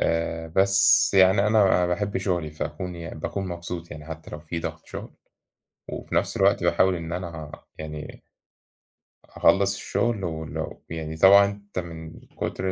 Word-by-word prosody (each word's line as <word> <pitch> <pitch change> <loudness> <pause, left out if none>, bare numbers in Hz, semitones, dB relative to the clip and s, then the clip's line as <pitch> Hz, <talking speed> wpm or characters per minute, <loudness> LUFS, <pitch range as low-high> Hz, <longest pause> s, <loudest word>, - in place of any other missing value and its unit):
آآ 80 0 -1
بس 100 +3 +5
يعني 95 +1 +6
أنا 110 +1 +3
أنا 90 -2 +4
باحب 100 +3 -1
شُغلي 90 -5 -1
فاكون 80 +4 -5
يعني 85 -2 -7
باكون 95 +4 -3
مبسوط 85 -1 -6
يعني 75 +1 -9
حتّى 80 0 -8
لو 75 - -7
في 80 +1 -5
ضَغْط - - -6
شُغل - - -8 0.8
وفي - - -6
نَفْس - - +1
الوقت 100 -2 +3
باحاول 90 +2 +3
إن 85 0 -6
أنا 85 -4 -6 0.3
يعني 75 -1 -8 1.0
أخلّص 100 0 +3
الشُغل 115 -2 -1
ولو 80 -2 -5
يعني 80 -1 -5
طبعًا 100 +3 +8
أنت 100 -1 -5
من 80 -2 -8
كُتر 95 0 -4
85 Hz, 150 wpm, -25 LUFS, 80-95 Hz, 1.0 s, طبعًا